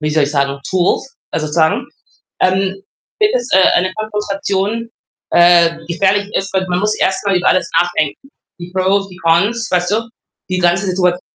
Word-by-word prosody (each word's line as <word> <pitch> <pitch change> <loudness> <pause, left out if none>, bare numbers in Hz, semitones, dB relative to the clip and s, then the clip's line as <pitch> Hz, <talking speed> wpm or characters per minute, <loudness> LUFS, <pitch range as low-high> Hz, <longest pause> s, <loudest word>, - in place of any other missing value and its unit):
wie 150 - -1
soll 155 0 +2
ich 140 - 0
sagen, 140 -1 -1
Tools, 190 +9 0 0.2
äh, - - -1
sozusagen. 160 - 0 0.5
Ähm, 190 +1 0 0.4
wird 425 +2 +2
es, - - -1
äh, 190 0 +6
eine 185 +1 +1
Konfrontation, 210 +1 -2 0.4
äh, 170 -1 +5
gefährlich 195 +4 0
ist, 195 - -1
weil 190 0 0
man 180 - +1
muss 210 +2 0
erst 190 +2 0
mal 195 -2 +2
über 180 - +2
alles 185 - +2
nachdenken. 175 - -1 0.3
Die 175 0 -9
Pros, 190 +1 +1
die 180 -1 -14
Cons, 195 +7 +1
weißt 180 0 +1
du? 225 +2 -1 0.4
Die 185 0 -1
ganze 175 +2 +2
Situat 180 -1 +1
185 Hz, 175 wpm, -16 LUFS, 175-200 Hz, 0.5 s, äh